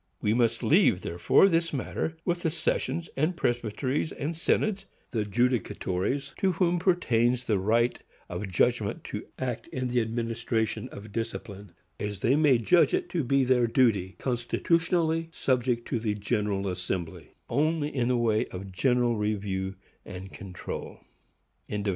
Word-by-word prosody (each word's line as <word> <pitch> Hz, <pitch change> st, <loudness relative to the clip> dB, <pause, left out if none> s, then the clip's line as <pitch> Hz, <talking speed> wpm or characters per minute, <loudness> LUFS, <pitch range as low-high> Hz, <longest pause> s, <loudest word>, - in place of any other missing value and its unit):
We 105 Hz, -, +1 dB
must 115 Hz, -1 st, +1 dB
leave, 155 Hz, -, +4 dB
therefore, 85 Hz, -, +4 dB
this 165 Hz, -2 st, +1 dB
matter 155 Hz, +3 st, -3 dB
with 175 Hz, 0 st, 0 dB
the 165 Hz, -, +1 dB
sessions, 165 Hz, +1 st, -1 dB, 0.3 s
presbyteries 120 Hz, +4 st, -1 dB
and 155 Hz, +3 st, -3 dB
synods,—the 190 Hz, -, -1 dB
judicatories 120 Hz, +2 st, 0 dB
to 190 Hz, -2 st, +2 dB
whom 175 Hz, 0 st, +2 dB
pertains 125 Hz, -, +2 dB
the 110 Hz, -5 st, +1 dB
right 115 Hz, +5 st, +2 dB, 0.3 s
of 105 Hz, -, -4 dB
judgment 105 Hz, +3 st, +1 dB
to -, -, -6 dB
act 125 Hz, -3 st, -3 dB
in 130 Hz, -1 st, -3 dB
the 120 Hz, 0 st, +2 dB
administration 115 Hz, -1 st, -2 dB
of 105 Hz, +1 st, -10 dB
discipline, 105 Hz, -4 st, -5 dB, 0.3 s
as 105 Hz, -2 st, -4 dB
they 130 Hz, -, +3 dB
may 150 Hz, -4 st, +5 dB
judge 170 Hz, -, +4 dB
it 370 Hz, -1 st, -3 dB
to 170 Hz, -5 st, -1 dB
be 135 Hz, +2 st, +3 dB
their 125 Hz, -2 st, +3 dB
duty, 115 Hz, -6 st, +2 dB
constitutionally 165 Hz, +6 st, 0 dB
subject 125 Hz, -5 st, 0 dB
to 120 Hz, -, 0 dB
the 110 Hz, -2 st, -1 dB
General 105 Hz, -2 st, -1 dB
Assembly 90 Hz, -2 st, -4 dB
only 155 Hz, 0 st, 0 dB
in 120 Hz, -3 st, +1 dB
the 125 Hz, -1 st, +2 dB
way 110 Hz, -2 st, +2 dB
of 95 Hz, +1 st, -8 dB
general 120 Hz, +3 st, +2 dB
review 100 Hz, -2 st, -2 dB, 0.3 s
and 95 Hz, +1 st, -9 dB
control. 95 Hz, -4 st, -7 dB
120 Hz, 140 wpm, -28 LUFS, 105-150 Hz, 0.3 s, may